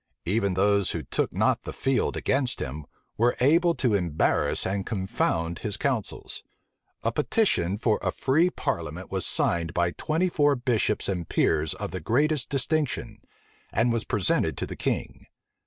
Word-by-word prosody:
Even 100 0 +1
those 100 0 +3
who 80 - -3
took - - -1
not - - +1
the - - -6
field 135 -1 0
against 130 -2 0
him, 70 +3 -5 0.3
were 120 +2 +3
able 165 +6 +4
to 125 -5 +1
embarrass 85 -6 +1
and 95 +1 -1
confound 85 -5 -1
his 105 -2 -1
counsels. 125 -6 -1 0.6
A 115 - +1
petition 115 - +1
for 110 -1 +1
a - - 0
free 155 +7 +2
parliament 85 - -4
was 95 -2 +1
signed 85 -1 0
by 85 0 +2
twenty 160 - 0
four 145 -4 +3
bishops 120 -4 0
and 90 -4 -3
peers 80 -1 +1
of - - -5
the 95 - -4
greatest 145 - +1
distinction, 135 -5 -1 0.5
and 115 +1 +2
was 115 -2 0
presented 100 -3 +1
to - - -2
the - - -7
king. - - -3
105 Hz, 155 wpm, -26 LUFS, 90-135 Hz, 0.6 s, able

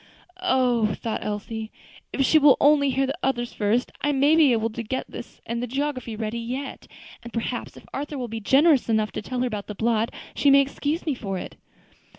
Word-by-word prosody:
"Oh!" 245 - +2
thought 225 - -4
Elsie, 215 +1 -4 0.4
"if 270 - +1
she 315 - +5
will 285 -2 +6
only 285 -1 +5
hear 270 +1 +1
the 275 +2 -3
others 240 -2 -1
first, 215 +4 0
I 290 - +2
may 285 +3 +4
be 310 -5 +6
able 225 -1 +1
to 235 - -5
get 260 +4 -3
this - - -9
and 235 0 -3
the 245 - -2
geography 260 -3 -3
ready 220 +1 -3
yet; 255 +4 -5 0.3
and 235 0 -10
perhaps, 235 +1 -4
if - - -14
Arthur 290 +1 -4
will 250 -2 -3
be 225 0 -5
generous 270 +4 +4
enough 215 -1 +1
to - - -4
tell 250 +4 -3
her - - +2
about 210 -4 -5
the 210 - -6
blot, 225 +1 +1 0.2
she 285 - +3
may 275 0 +7
excuse 285 +3 -2
me 305 - +1
for 195 -6 -4
it." - - -7
245 Hz, 210 wpm, -24 LUFS, 225-275 Hz, 0.4 s, may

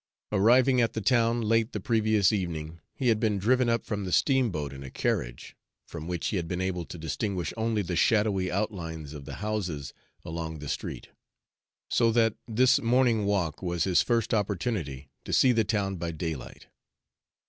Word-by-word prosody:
Arriving 125 +5 +4
at 115 - +1
the - - -2
town 115 +1 +2
late 115 +2 +1
the - - -2
previous 110 -4 +2
evening, 85 -5 -3 0.2
he 130 -3 +1
had 110 -2 +3
been 110 -3 +1
driven 125 +5 +2
up 115 -1 0
from 105 -2 -3
the 95 - -4
steamboat 100 - +1
in 70 - -9
a 70 - -7
carriage, - - -3 0.3
from 80 -1 -7
which 90 -2 -2
he 100 - -1
had 85 -2 -3
been 90 +1 -3
able 95 -2 -2
to 85 - -9
distinguish 85 +3 -3
only 110 -2 0
the 90 -1 -3
shadowy 100 -1 +2
outlines 85 -7 -3
of 70 -2 -9
the 70 - -7
houses 90 -10 -3 0.3
along 80 -1 -5
the 75 0 -8
street; - - -5 0.8
so 115 -1 +3
that 115 -1 +3
this 125 +3 +3
morning 120 -3 +3
walk 95 -7 0
was 85 -2 -1
his 95 -2 +3
first 115 -1 0
opportunity 90 - -2
to - - -7
see 130 - +5
the 115 -2 +3
town 100 -2 -1
by 85 0 -3
daylight. 80 -5 -6
100 Hz, 180 wpm, -28 LUFS, 85-115 Hz, 0.8 s, see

